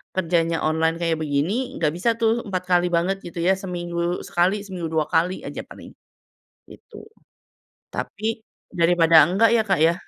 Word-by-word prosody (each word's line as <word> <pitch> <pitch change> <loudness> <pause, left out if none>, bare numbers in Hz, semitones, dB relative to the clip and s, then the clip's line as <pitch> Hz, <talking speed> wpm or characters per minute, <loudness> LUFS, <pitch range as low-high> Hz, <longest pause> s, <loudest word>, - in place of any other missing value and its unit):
kerjanya 165 -2 0
online 160 +1 +1
kayak 165 -1 0
begini, 150 +4 -1 0.2
nggak 155 -3 0
bisa, 195 +7 0
tuh, 230 0 0
4 185 -2 -3
kali 175 0 +3
banget 175 +3 0
gitu, 170 0 -8
ya, 190 +2 +4
seminggu 175 -1 -3
sekali 190 +4 +1
seminggu 180 -4 -5
2 155 -1 +2
kali 175 +3 0
aja - - -6
paling, - - -12 0.8
gitu. - - -14 0.9
Tapi 220 +2 -4 0.3
daripada 165 -1 +4
enggak, 200 +6 +3
ya, 220 - +3
Kak, 195 -5 +1
ya. 165 +1 +4
175 Hz, 155 wpm, -22 LUFS, 165-195 Hz, 0.9 s, ya